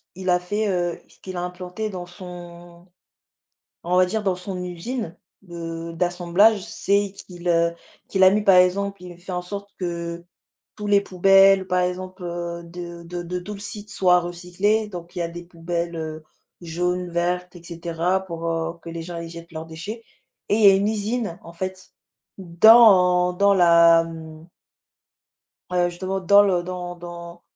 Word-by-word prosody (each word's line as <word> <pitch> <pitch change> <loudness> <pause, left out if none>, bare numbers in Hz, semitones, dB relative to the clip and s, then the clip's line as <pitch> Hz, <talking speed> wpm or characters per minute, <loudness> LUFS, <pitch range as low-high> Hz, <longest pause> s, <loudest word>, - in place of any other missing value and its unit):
il 185 +1 -4
a 180 0 +4
fait, 205 +4 -2
heu, 175 -2 -1
ce - - -23
qu'il 185 -1 -8
a - - -2
implanté 180 +4 -5
dans 180 -3 -6
son 175 -1 -12 1.0
on 175 +1 0
va 185 - +6
dire, 210 +3 -2
dans 190 -2 +1
son 180 0 -6
usine 180 +2 -5 0.2
de 170 -2 -7
d'assemblage, 180 +5 +2
c'est 200 0 0
qu'il, 180 -3 -10
heu, 170 0 +2 0.4
qu'il 190 -1 +2
a 185 - +9
mis 205 +2 +1
par 195 -2 +6
exemple, 195 +2 +2
il 180 - -9
a - - -18
fait 180 +2 -10
en 180 0 -2
sorte 200 +3 -7
que 170 -1 -4 0.5
tous 210 -1 -6
les 200 -1 +4
poubelles, 195 0 +5
par 180 0 +1
exemple, 185 +1 -4
heu, 170 0 -5
de 170 0 -9
de 175 +1 -6
de 180 +1 -4
tout 205 +4 -7
le 200 - -9
site 205 +1 -8
soit 180 -4 +3
recyclées. 180 +5 -1
Donc 175 -2 -9
il 175 - -4
y - - 0
a 170 - -1
des 175 +1 -8
poubelles, 170 0 -4
heu, 155 -1 -6 0.4
jaunes, 180 +2 -2
vertes 180 +1 -2
et 170 - -15
cetera, 170 +2 -2
pour, 170 -2 -6
heu, 165 0 -2
que 170 - -9
les 165 0 -6
gens 175 0 -7
ils 170 - -7
jettent 170 +1 -11
leurs 160 0 -6
déchets 185 +8 -8 0.5
et - - +3
il 220 - +1
y - - +10
a 195 - +8
une 200 +2 +1
usine 215 -3 -2
en 170 - -11
fait 185 +2 -6 0.4
dans 180 -1 +6
dans 200 +2 +4
la 170 -2 +6
mmh 160 0 -10 1.2
heu, 175 -1 +2
justement 190 +2 -4
dans 200 +3 +6
le 185 -4 +1
dans 180 0 -6
dans 170 0 -10
180 Hz, 185 wpm, -23 LUFS, 170-195 Hz, 1.2 s, y